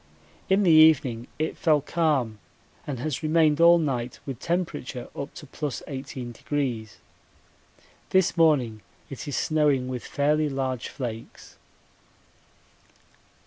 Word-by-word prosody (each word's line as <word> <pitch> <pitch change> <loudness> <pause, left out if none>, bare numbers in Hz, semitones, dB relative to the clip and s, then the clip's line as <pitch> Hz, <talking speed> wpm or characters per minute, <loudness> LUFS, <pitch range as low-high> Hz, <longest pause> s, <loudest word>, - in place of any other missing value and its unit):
In 195 +2 +4
the 175 - +5
evening 150 -7 +5
it 155 +1 -2
fell 155 -3 +3
calm 140 -9 0 0.5
and 140 -3 -3
has 135 +2 -3
remained 155 -1 +3
all 170 +1 +8
night 130 -7 -2
with 135 -4 -6
temperature 165 -8 -3
up 140 - -5
to 175 - -9
+ - - -34
18°. 130 -4 -4 1.1
This 190 -2 +2
morning 135 -10 +2 0.3
it 135 +1 -7
is 145 - -2
snowing 150 -5 +1
with 125 -2 -4
fairly 150 +1 +1
large 130 -3 -3
flakes. 115 -4 -7
145 Hz, 115 wpm, -26 LUFS, 125-155 Hz, 1.1 s, all